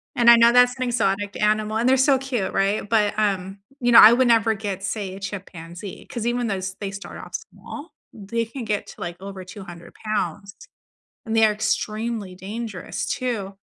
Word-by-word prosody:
And 235 -1 +5
I 235 - +10
know 230 0 +6
that's 245 0 +5
an 255 - -3
exotic 205 -5 -1
animal, 215 +1 +1
and 235 +3 +1
they're 265 - +5
so 265 +1 +4
cute, 255 -7 -3
right? 200 +1 0
But, 215 -3 +2
um, 195 -2 -1 0.2
you 245 -2 +2
know, 230 - +11
I 215 - +10
would 250 +1 +3
never 225 -1 +4
get, 200 -2 -5
say, 195 -2 -4
a - - -9
chimpanzee 185 -2 -8
'cause 235 -2 -5
even 240 0 0
though 200 - -1
s 190 0 -5
they 200 -1 -3
start 200 0 -9
off - - -11
small, 295 +3 -9 0.2
they 225 +2 -3
can 235 +2 -7
get 210 -1 -2
to - - -13
like 175 0 -5
over 195 -1 -8
200 180 -3 -11
pounds, 210 -2 -4 0.7
and 225 0 -2
they 225 0 +6
are 215 - +3
extremely 215 -1 -2
dangerous 205 +1 -5
too, 215 -6 -3
215 Hz, 195 wpm, -23 LUFS, 195-235 Hz, 0.7 s, know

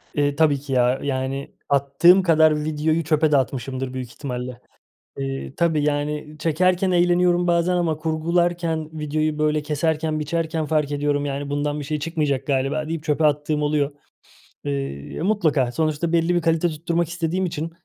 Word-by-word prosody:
Eee, 145 -1 +1
tabii 150 -3 +3
ki 135 0 -6
ya. 125 +1 +2
Yani 135 0 -3 0.2
attığım 140 +7 +5
kadar 155 -3 +4
videoyu 155 +2 0
çöpe 155 0 +2
de 145 - +5
atmışımdır 130 0 -2
büyük 130 -2 -5
ihtimalle. 125 -2 -6 0.6
Eee, 135 0 -4
tabii, 165 -3 +2
yani, 150 +1 -2
çekerken 180 +4 +2
eğleniyorum 175 0 +3
bazen 175 +1 +2
ama 170 -3 0
kurgularken, 165 0 -1
videoyu, 155 0 -2
böyle, 150 0 +1
keserken, 155 +1 -1
biçerken, 160 +1 -2
fark 150 -2 0
ediyorum, 145 0 0
yani, 140 0 -4
"Bundan 145 +1 -1
bir - - -5
şey 150 +2 -2
çıkmayacak 145 -4 -1
galiba." 140 +3 0
deyip 160 -1 -4
çöpe 155 0 +1
attığım 150 0 0
oluyor. 145 -1 +1 0.7
Eee, 70 - -4
mutlaka, 160 - +1
sonuçta 160 +2 -1
belli 170 +1 +2
bir 175 - +1
kalite 165 +1 +2
tutturmak 165 +1 -1
istediğim 175 +2 -1
için 165 -1 -4
155 Hz, 155 wpm, -22 LUFS, 145-165 Hz, 0.7 s, attığım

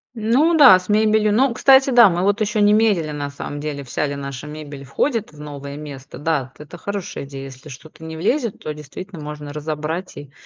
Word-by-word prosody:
Ну 255 +10 +2
да, 250 -11 +9
с 185 - -14
мебелью, 215 0 +3
но, 250 +4 +3
кстати, 265 +2 +5
да, 235 -5 +8
мы 175 +1 -1
вот 205 +2 +1
еще 210 0 0
не 205 0 +5
меряли, 200 -8 +2
на 145 -1 -4
самом 145 +1 -7
деле, 145 -2 -5
вся 145 +3 -2
ли 140 - -4
наша 140 0 -7
мебель 145 -2 -8
входит 225 - -1
в 150 - -16
новое 140 -1 -8
место. 145 -3 -9
Да, 150 -3 0
вот 130 - -19
это 175 - -11
хорошая 200 -5 -5
идея, 135 -1 -8
если 135 +2 -11
что-то 155 +4 -13
не 160 0 -7
влезет, 230 - 0
то 155 - -6
действительно 155 +4 -9
можно 150 -1 -7
разобрать 155 +4 -4
и 145 -2 -10
155 Hz, 210 wpm, -20 LUFS, 145-210 Hz, -, да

